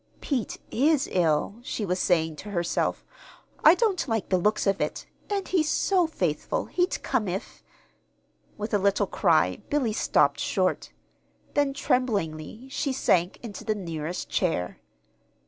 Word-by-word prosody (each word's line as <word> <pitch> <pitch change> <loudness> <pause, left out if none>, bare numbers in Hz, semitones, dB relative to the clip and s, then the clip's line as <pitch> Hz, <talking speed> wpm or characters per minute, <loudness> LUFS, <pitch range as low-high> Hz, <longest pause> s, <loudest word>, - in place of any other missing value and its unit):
"Pete 260 -7 -2
is 290 +3 +2
ill," 170 +3 +1
she 230 -3 -3
was 180 0 -1
saying 160 -4 +2
to 210 - -8
herself. 175 -3 -1 0.6
"I 315 - +8
don't 390 -7 +1
like 225 -4 -1
the 185 - +3
looks 210 +4 +1
of 195 -1 +1
it; - - -2 0.2
and 400 -2 -1
he's 320 -5 +1
so 365 -4 +2
faithful 175 - -1
he'd 360 +1 -1
come 245 -6 0
if 185 +2 -5 0.5
" - - -39
With 210 +2 -5
a 205 - +4
little 200 +1 +2
cry 160 - +2
Billy 265 -7 +1
stopped - - +2
short. - - 0 0.6
Then, 285 -1 +1
tremblingly, 215 - -1
she 280 0 -1
sank 190 -8 +1
into 215 -4 -7
the 215 - 0
nearest 165 -3 -4
chair. 125 - -1
210 Hz, 145 wpm, -26 LUFS, 175-270 Hz, 0.6 s, I